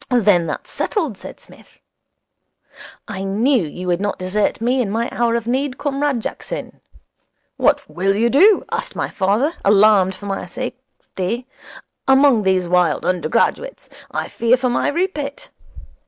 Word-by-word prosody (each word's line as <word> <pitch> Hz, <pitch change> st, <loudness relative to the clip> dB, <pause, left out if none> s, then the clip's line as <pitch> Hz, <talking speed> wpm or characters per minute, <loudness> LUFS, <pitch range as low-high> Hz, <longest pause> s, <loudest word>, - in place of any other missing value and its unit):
'Then 205 Hz, -9 st, +3 dB
that's -, -, -6 dB
settled,' 315 Hz, -, -2 dB
said -, -, -10 dB
Psmith. -, -, -18 dB, 1.3 s
'I 195 Hz, -3 st, -5 dB
knew 220 Hz, +5 st, +2 dB
you 175 Hz, +4 st, -7 dB
would 180 Hz, +1 st, 0 dB
not 205 Hz, 0 st, -2 dB
desert 185 Hz, +3 st, -1 dB
me 250 Hz, +3 st, +1 dB
in 220 Hz, -, -2 dB
my 230 Hz, +3 st, -1 dB
hour 235 Hz, -1 st, +1 dB
of 235 Hz, -1 st, -2 dB
need, 260 Hz, +2 st, -1 dB
Comrade 280 Hz, -3 st, -1 dB
Jackson. -, -, -6 dB, 0.8 s
"What 290 Hz, -1 st, +2 dB
will 195 Hz, +2 st, 0 dB
you 225 Hz, +3 st, +2 dB
do," 390 Hz, +9 st, +5 dB
asked -, -, -4 dB
my -, -, -2 dB
father, 215 Hz, -, +1 dB
alarmed 200 Hz, -2 st, +4 dB
for 205 Hz, -, -11 dB
my 195 Hz, -2 st, -4 dB
safety, 245 Hz, -1 st, -6 dB, 0.6 s
"among 265 Hz, -3 st, +5 dB
these 190 Hz, -2 st, +1 dB
wild 175 Hz, -3 st, +1 dB
undergraduates? 185 Hz, -, -1 dB, 0.2 s
I -, -, -3 dB
fear 235 Hz, +2 st, +2 dB
for 255 Hz, 0 st, 0 dB
my 240 Hz, -, 0 dB
Rupert." 340 Hz, -, -3 dB
230 Hz, 145 wpm, -19 LUFS, 195-270 Hz, 1.3 s, do